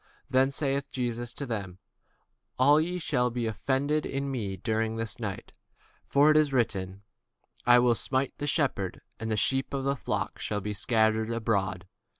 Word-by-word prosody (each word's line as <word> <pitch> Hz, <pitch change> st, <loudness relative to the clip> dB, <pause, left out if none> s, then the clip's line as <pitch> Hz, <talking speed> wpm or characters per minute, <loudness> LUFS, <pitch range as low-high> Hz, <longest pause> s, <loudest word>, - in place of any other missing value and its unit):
Then 130 Hz, +1 st, +4 dB
saith 140 Hz, 0 st, -1 dB
Jesus 120 Hz, -1 st, -2 dB
unto 140 Hz, -, -5 dB
them, 100 Hz, -7 st, -4 dB, 0.8 s
All 145 Hz, +4 st, +6 dB
ye 175 Hz, +3 st, -2 dB
shall 130 Hz, -7 st, +1 dB
be 120 Hz, 0 st, -2 dB
offended 135 Hz, +8 st, 0 dB
because 135 Hz, -, -4 dB
of 140 Hz, -, 0 dB
me 120 Hz, -8 st, -3 dB
this 110 Hz, +1 st, -2 dB
night: 100 Hz, -4 st, -5 dB, 0.5 s
for 145 Hz, +2 st, +4 dB
it 155 Hz, -, +4 dB
is 150 Hz, -2 st, +3 dB
written, 100 Hz, -6 st, -1 dB, 0.6 s
I 120 Hz, 0 st, +8 dB
will 120 Hz, -1 st, +4 dB
smite 130 Hz, +3 st, -1 dB
the 145 Hz, -, -2 dB
shepherd, 135 Hz, -, 0 dB, 0.2 s
and 110 Hz, -, -4 dB
the 110 Hz, -, 0 dB
sheep 135 Hz, +6 st, +1 dB
of 135 Hz, -, -2 dB
the 140 Hz, +1 st, +1 dB
flock -, -, -3 dB
shall 105 Hz, -, -2 dB
be 105 Hz, +1 st, -4 dB
scattered 110 Hz, 0 st, +2 dB
abroad. 105 Hz, -5 st, -1 dB
120 Hz, 165 wpm, -28 LUFS, 110-140 Hz, 0.8 s, I